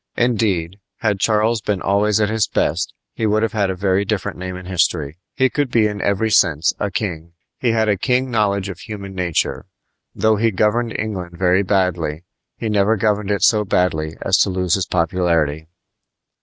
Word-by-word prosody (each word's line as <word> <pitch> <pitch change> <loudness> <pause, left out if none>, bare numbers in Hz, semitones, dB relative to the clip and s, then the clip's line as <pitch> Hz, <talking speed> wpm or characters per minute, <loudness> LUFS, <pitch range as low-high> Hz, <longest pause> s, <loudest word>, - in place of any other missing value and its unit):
Indeed, 100 -7 0 0.2
had 105 -3 0
Charles 110 +2 +2
been 105 -2 -1
always 100 +3 +1
at 105 - +2
his 110 0 0
best - - -1 0.2
he 110 - -1
would 110 +1 +2
have 115 - -1
had 100 -3 +1
a 95 - -2
very 95 +1 +1
different 100 -1 -2
name 90 0 -6
in 90 0 -9
history. 85 -3 -1 0.2
He 130 0 +3
could 145 0 -1
be 115 -3 +3
in 105 -2 -2
every 100 +2 0
sense 80 -6 +3
a 100 - -1
king. 85 -4 -4 0.3
He 125 - +1
had 110 -1 +2
a 105 -2 +2
keen 125 +3 0
knowledge 100 -3 +1
of 95 -3 -7
human 100 -3 -8
nature. 90 -4 -1 0.5
Though 110 -1 +2
he 115 +2 +2
governed 110 +4 0
England 90 -5 -5
very 90 +1 +3
badly, 90 -5 0 0.3
he 115 - -3
never 105 +1 +2
governed 105 -1 0
it 100 -1 0
so 105 -2 +4
badly 80 -5 0
as 95 - +3
to - - +3
lose 90 -2 0
his 95 -1 +1
popularity. 85 -4 0
100 Hz, 185 wpm, -19 LUFS, 90-110 Hz, 0.5 s, so